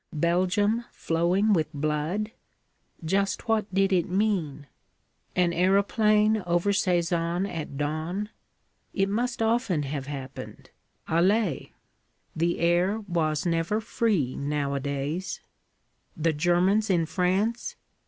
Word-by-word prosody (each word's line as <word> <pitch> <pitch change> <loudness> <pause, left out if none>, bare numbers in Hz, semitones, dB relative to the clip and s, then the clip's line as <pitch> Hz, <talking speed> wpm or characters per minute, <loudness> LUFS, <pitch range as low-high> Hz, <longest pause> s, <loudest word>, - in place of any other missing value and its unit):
Belgium 185 +8 +1
flowing 180 +6 +1
with 155 -4 +1
blood? 155 +9 -1 0.7
Just 195 +6 0
what 220 -3 +1
did 195 +1 +2
it 180 -2 +1
mean? 180 -8 0 0.7
An 180 -1 +2
aeroplane 210 +4 +3
over 175 +3 +2
Sézanne 175 -1 +1
at 155 -6 -6
dawn? 160 +8 -2 0.7
It 195 0 +1
must 235 +2 -1
often 225 - +1
have 135 -1 -4
happened, 135 -2 -8 0.4
allez! 180 - +1 0.7
The 170 +2 0
air 175 +5 +2
was 165 -6 -1
never 170 +5 0
free, 215 - 0
nowadays. 140 +4 -2 0.8
The 165 0 +1
Germans 180 +7 +2
in 170 -4 +2
France? 195 - 0
180 Hz, 105 wpm, -26 LUFS, 155-205 Hz, 0.8 s, aeroplane